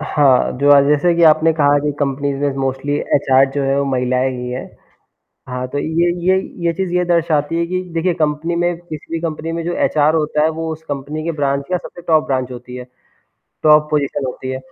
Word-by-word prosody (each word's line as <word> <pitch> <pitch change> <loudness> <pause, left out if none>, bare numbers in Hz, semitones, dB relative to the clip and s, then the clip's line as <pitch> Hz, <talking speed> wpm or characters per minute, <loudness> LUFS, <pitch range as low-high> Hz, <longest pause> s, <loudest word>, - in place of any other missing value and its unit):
हाँ, 145 -4 +2
जो 145 +1 +3
अ, 140 -1 +8
जैसे 150 +4 +3
कि 170 - +1
आपने 155 +1 +3
कहा 145 -2 +3
कि 145 +1 -1
कंपनीज़ 140 0 -1
में 140 -1 0
मोस्टली 135 +2 -2 0.2
एचआर 135 -1 +4
जो 145 - 0
है 135 +1 +1
वो 140 - +1
महिलाएँ 125 0 0
ही 125 0 -5
हैं। 125 +1 -4 0.9
हाँ, 125 0 -4
तो 135 - -5
ये 165 +3 +1 0.2
ये 190 0 +5 0.3
ये 170 - +2
चीज़ 180 0 -3
ये 180 0 +2
दर्शाती 165 -3 +1
है 170 - 0
कि 185 +1 -2
देखिए 170 +2 0
कंपनी 155 +2 0
में 175 0 0
किसी 165 -3 -10
भी 165 - -1
कंपनी 160 -1 -4
में 165 0 -3
जो 175 - -2
एचआर 150 +1 +2
होता 150 -1 +1
है, 155 - +3
वो 160 0 -4
उस 160 0 -7
कंपनी 145 +1 -5
के 170 - -1
ब्रांच 140 -2 -1
या 180 - +2
सबसे 175 - -11
टॉप 155 -2 +3
ब्रांच 130 -2 -1
होती 125 0 -9
है? 125 - -6 0.8
टॉप 150 0 +5
पोजीशन 145 -2 -1
होती 130 +1 -5
है, 130 - -3
150 Hz, 220 wpm, -18 LUFS, 135-165 Hz, 0.9 s, अ